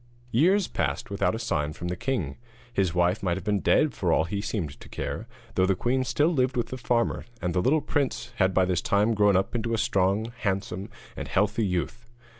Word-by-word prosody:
Years 185 - +4
passed - - -2
without - - +1
a - - -2
sign 75 +1 -1
from 85 - -6
the 90 - -2
king. 130 +4 -2 0.4
His 95 -5 +1
wife 90 +3 +2
might 90 -2 0
have - - -6
been 105 -1 +1
dead 150 +5 +3
for 90 -5 0
all 80 - +4
he 100 +5 -3
seemed 95 -9 -3
to - - -13
care, - - -4 0.3
though 95 0 +3
the 95 - +3
queen 130 +7 +1
still 130 +6 +2
lived 130 -3 +1
with 120 - -1
the 130 - -5
farmer, 120 -1 0
and 90 -1 -2
the 90 - +2
little 150 +9 +3
prince 130 -5 -2
had 95 -2 +3
by 95 0 +3
this 90 -1 0
time 105 +3 +2
grown 105 -2 +4
up 95 - -1
into 115 -1 -1
a - - -1
strong, 100 +3 +1
handsome, 100 0 -2 0.3
and - - -5
healthy 105 +2 +1
youth. 95 +6 -3
105 Hz, 220 wpm, -27 LUFS, 95-120 Hz, 0.4 s, Years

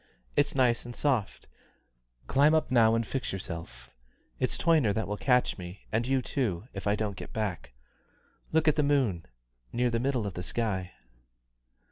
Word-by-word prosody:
It's - - +2
nice 125 -3 +3
and 120 0 -8
soft 130 -9 -1 0.8
climb 145 +3 +4
up 155 - +1
now 115 -2 +5
and 115 0 0
fix 130 +2 -3
yourself. 85 -3 -7 0.5
It's - - 0
Toyner 155 -11 +3
that 110 - -1
will 105 - -2
catch 125 -1 +2
me, 90 +2 -8
and 115 +2 0
you 135 -1 +1
too, 110 - -2
if 95 +1 -5
I 100 - +3
don't 105 -2 -2
get - - -9
back. 100 - -3 0.8
Look 160 0 +2
at 155 - +4
the - - +4
moon 135 - +1 0.4
near 120 0 +1
the 115 - 0
middle 125 -3 0
of 100 - -3
the 90 - -5
sky." 95 -2 -2
115 Hz, 170 wpm, -29 LUFS, 100-135 Hz, 0.8 s, now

